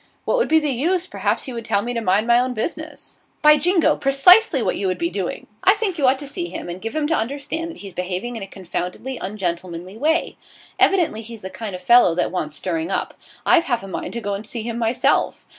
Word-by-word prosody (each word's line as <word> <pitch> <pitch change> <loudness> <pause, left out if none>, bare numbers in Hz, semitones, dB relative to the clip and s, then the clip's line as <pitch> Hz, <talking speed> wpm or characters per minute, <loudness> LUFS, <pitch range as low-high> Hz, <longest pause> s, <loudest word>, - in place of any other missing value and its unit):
'What - - +1
would 485 - +2
be 320 - +4
the 300 -2 0
use? 335 +8 0
Perhaps - - -1
he 260 - -6
would 230 -1 -5
tell 205 -2 0
me 245 +1 -3
to 230 - -2
mind 205 +1 +2
my 240 0 +5
own 250 0 -1
business.' 220 +10 -6 0.2
'By 300 0 +7
jingo! 355 +2 +3
precisely 280 +11 +5
what - - 0
you 195 - -1
would 185 -1 -1
be 170 0 -1
doing. 190 -1 -4 0.2
I 390 - +6
think 400 -6 -2
you 275 - +3
ought 260 +1 +4
to 285 +1 -8
see 345 +4 -4
him - - -6
and 175 +2 -6
give 225 +6 -5
him 310 -1 0
to 315 - +1
understand 285 +6 -2
that 335 - -9
he's 195 -2 -9
behaving 185 +7 -4
in 225 - -6
a 195 - -6
confoundedly 190 +7 -5
ungentlemanly 185 -1 -4
way. 320 +6 0 0.4
Evidently 345 - +3
he's 225 -2 -10
the 190 - -6
kind 200 0 -6
of 180 - -9
fellow 235 -6 +6
that 180 - 0
wants 155 -5 -3
stirring 165 +1 -2
up. - - -2 0.3
I've 335 - +4
half 240 -6 -1
a - - -7
mind 190 - -5
to 235 - -4
go 205 -2 -2
and 200 +2 -4
see 220 +1 -5
him 235 0 -4
myself. 230 +1 +1
230 Hz, 240 wpm, -21 LUFS, 190-295 Hz, 0.4 s, By